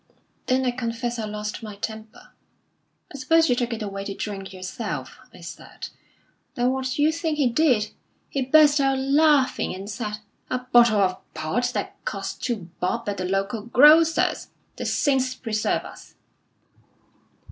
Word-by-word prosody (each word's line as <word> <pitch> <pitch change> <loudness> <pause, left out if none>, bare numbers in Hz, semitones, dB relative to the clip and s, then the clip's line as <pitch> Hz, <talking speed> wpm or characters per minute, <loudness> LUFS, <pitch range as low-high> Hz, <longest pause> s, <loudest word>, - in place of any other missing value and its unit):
"Then 260 +1 +2
I 250 - +2
confess 240 0 -3
I 220 - -2
lost 210 0 -5
my 215 -2 -8
temper. 220 +1 -8 0.8
'I - - -6
suppose 325 +5 +3
you - - +4
took 245 0 -1
it 225 -1 -3
away 195 -1 -5
to 200 - -5
drink 195 -2 -5
yourself?' 185 -1 -6
I - - -15
said. - - -9 0.7
Then 245 +1 +2
what 265 0 -2
d'you 290 +4 +2
think 320 -1 -2
he 285 -4 +3
did? 240 -4 +2 0.4
He 275 - -2
burst 295 +2 +5
out 270 -1 +2
laughing, 275 -4 +2
and 195 +2 -8
said: 210 0 -4 0.3
'A - - 0
bottle 235 -4 +6
of 185 -1 -2
port 160 +10 -1
that - - -4
cost - - -5
two 200 -9 -3
bob 210 +6 -2
at 200 - -3
the 185 - -3
local 195 +4 -1
grocer's! 300 +8 +5 0.3
The - - -4
saints 260 -3 +1
preserve 220 -4 -1
us!'" - - -13
240 Hz, 160 wpm, -24 LUFS, 210-270 Hz, 0.8 s, bottle